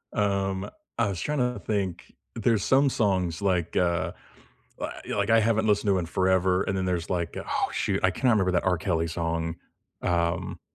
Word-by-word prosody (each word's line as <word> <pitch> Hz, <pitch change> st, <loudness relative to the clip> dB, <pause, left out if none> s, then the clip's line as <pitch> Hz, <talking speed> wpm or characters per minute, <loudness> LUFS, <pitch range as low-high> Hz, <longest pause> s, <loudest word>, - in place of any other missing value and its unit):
Um, 100 Hz, -2 st, 0 dB, 0.3 s
I 115 Hz, -, +3 dB
was 90 Hz, -4 st, -4 dB
trying 150 Hz, -, -1 dB
to 125 Hz, 0 st, 0 dB
think, 100 Hz, -5 st, -2 dB, 0.2 s
there's 115 Hz, -3 st, +1 dB
some 135 Hz, +2 st, +4 dB
songs, 95 Hz, -8 st, 0 dB
like, 90 Hz, -4 st, 0 dB
uh, 85 Hz, -1 st, +1 dB, 0.7 s
wa -, -, -3 dB
yeah, -, -, -4 dB
like, 100 Hz, +2 st, 0 dB
I 115 Hz, 0 st, +6 dB
haven't 110 Hz, 0 st, +2 dB
listened 105 Hz, 0 st, +2 dB
to 95 Hz, -1 st, +4 dB
in 85 Hz, -, -2 dB
forever, 95 Hz, +1 st, +2 dB
and 95 Hz, -, -2 dB
then 95 Hz, -, -1 dB
there's, 90 Hz, -1 st, -2 dB
like 85 Hz, -2 st, -2 dB
oh, -, -, -1 dB
shoot, -, -, 0 dB
I -, -, +4 dB
can't 130 Hz, -, -2 dB
ever 120 Hz, -, +6 dB
remember 95 Hz, -3 st, +2 dB
that 90 Hz, -, +1 dB
R. 90 Hz, -2 st, +2 dB
Kelly 85 Hz, -1 st, 0 dB
song, 85 Hz, 0 st, -2 dB, 0.4 s
um, 85 Hz, -1 st, -1 dB
95 Hz, 195 wpm, -27 LUFS, 85-105 Hz, 0.7 s, I